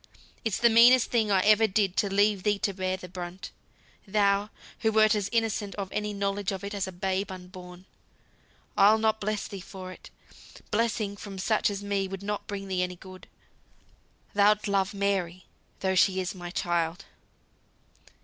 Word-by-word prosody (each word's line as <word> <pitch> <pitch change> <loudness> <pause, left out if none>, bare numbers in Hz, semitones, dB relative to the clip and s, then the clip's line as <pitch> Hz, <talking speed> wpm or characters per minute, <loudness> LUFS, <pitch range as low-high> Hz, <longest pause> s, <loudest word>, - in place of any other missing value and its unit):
It's 225 -4 0
the 235 - +4
meanest 240 +2 +6
thing 225 -3 +2
I 195 -2 +3
ever 215 +1 +5
did 195 -2 0
to 200 - +1
leave 205 0 +3
thee 205 +1 +1
to 200 0 -1
bear 185 0 -2
the 185 - -10
brunt. 180 +1 -7 0.6
Thou, 200 0 +2 0.3
who 220 - +1
wert 215 0 +5
as 205 -2 -1
innocent 225 -3 -1
of 195 -2 -5
any 210 0 -2
knowledge 200 -1 -2
of 195 -1 -5
it 200 +1 -5
as 200 -2 -1
the 190 - -6
babe 190 +2 -2
unborn. 180 0 -11 0.9
I'll 210 +2 +6
not 220 0 +1
bless 210 0 -2
thee 195 -2 -8
for 185 0 -9
it. - - -13 0.6
Blessing 215 -2 0
from 200 -1 -8
such 210 +4 +1
as 200 0 -5
me 200 -1 -1
would 195 +1 -7
not 210 0 -4
bring 195 -1 -5
thee 185 -1 -1
any 180 0 -2
good. 185 +1 -13 1.1
Thou'lt 210 +1 +3
love 195 0 0
Mary, 190 -3 -1 0.4
though 190 -1 +1
she 190 0 +3
is 185 -1 -2
my 175 -2 -8
child." 175 0 -1
200 Hz, 175 wpm, -27 LUFS, 185-210 Hz, 1.1 s, meanest